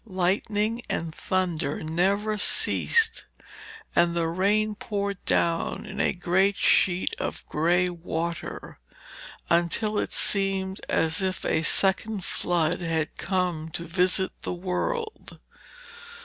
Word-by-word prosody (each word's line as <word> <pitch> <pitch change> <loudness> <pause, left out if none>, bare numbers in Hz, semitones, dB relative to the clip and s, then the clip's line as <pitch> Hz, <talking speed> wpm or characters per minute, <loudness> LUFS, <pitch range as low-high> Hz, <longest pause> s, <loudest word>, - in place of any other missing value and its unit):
Lightning 205 +3 -1
and 160 -1 -3
thunder 170 -6 -2
never 195 +7 0
ceased, 445 - +4 0.7
and 170 0 +3
the 170 -1 0
rain 205 +5 +1
poured 200 -2 -4
down 165 -1 0
in - - -8
a - - +2
great 190 +3 +1
sheet 180 -1 +2
of - - -5
grey 175 +4 +1
water, 170 -1 -5 0.7
until 175 +6 +1
it - - -3
seemed 195 -1 +2
as 160 +4 +1
if 185 -1 -2
a 160 - +1
second 195 +4 +2
flood 175 0 0
had 160 -2 -2
come 180 -4 -2
to 170 - -5
visit 180 +2 +1
the - - -4
world. 435 - -4
185 Hz, 115 wpm, -26 LUFS, 170-200 Hz, 0.7 s, ceased